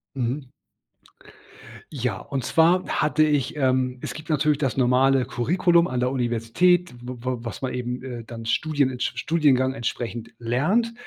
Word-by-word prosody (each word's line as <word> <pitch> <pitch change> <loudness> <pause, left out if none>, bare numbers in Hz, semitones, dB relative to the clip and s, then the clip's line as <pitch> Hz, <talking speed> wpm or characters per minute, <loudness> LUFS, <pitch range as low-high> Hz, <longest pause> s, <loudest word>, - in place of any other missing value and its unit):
Mhm. 130 +2 -2 1.4
Ja, 125 -5 -2
und 135 -3 -4
zwar 170 +5 +3
hatte 150 +1 +1
ich 150 0 +1
ähm, 130 -2 +1
es - - -4
gibt 155 +2 -10
natürlich 150 -1 +2
das 135 -4 -1
normale 130 +1 +3
„Curriculum“ 170 +8 +2
an 125 - -2
der 125 +1 +1
Universität, 130 +9 +1
w 125 +1 -7
w 125 +1 -3
was 115 +2 -7
man 130 - -2
eben, 125 0 -4
äh, 120 -3 -7
dann 115 0 -9
studienentsp 135 0 0
studiengangsentsprechend 130 -6 0
lernt, 155 - +1
130 Hz, 140 wpm, -24 LUFS, 125-155 Hz, 1.4 s, zwar